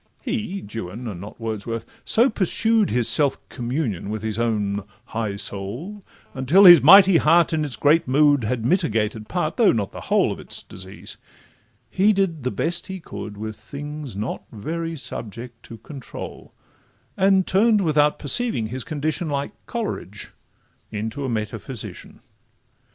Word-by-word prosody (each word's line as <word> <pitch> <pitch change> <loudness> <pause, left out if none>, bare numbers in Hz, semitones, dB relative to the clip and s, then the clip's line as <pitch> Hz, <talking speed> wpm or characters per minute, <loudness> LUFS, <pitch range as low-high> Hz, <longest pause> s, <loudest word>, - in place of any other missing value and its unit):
He, 210 -5 -3
Juan 115 +2 -6
(and 95 -5 -6
not 105 +4 -10
Wordsworth), 115 0 -4 0.2
so 235 +4 +4
pursued 220 0 +2
His 120 -1 +2
self 145 -3 +5
communion 120 - -3
with 110 0 -4
his 110 0 -2
own 105 -3 0 0.2
high 110 -3 -3
soul, 115 - -5 0.3
Until 145 +10 +4
his 175 -5 +11
mighty 190 - +8
heart, 170 +1 +4
in 155 -1 +1
its 145 -4 -2
great 150 +2 +3
mood, 145 0 +4
Had 115 +1 -2
mitigated 110 - 0
part, 175 -3 -2
though 230 - +5
not 105 -4 -2
the - - -9
whole - - +3
Of - - -6
its - - -6
disease; 95 +1 -9 0.7
he 205 +3 +3
did 190 -6 0
the 125 - -1
best 170 +6 -2
he 190 0 -6
could 105 - -8
With 110 +1 -5
things 140 +2 -8
not 105 +4 -4
very 165 +9 -4
subject 120 -3 -7
to 115 - -10
control, 135 +1 -9 0.6
And 190 -1 +3
turn'd, 210 +3 +3
without 150 -3 +2
perceiving 145 - 0
his 130 +2 -4
condition, 155 +2 -3
Like 140 +3 -2 0.2
Coleridge, 210 - -5 0.6
into 110 +6 -4
a - - -2
metaphysician. 110 +2 -6
135 Hz, 150 wpm, -22 LUFS, 110-170 Hz, 0.7 s, his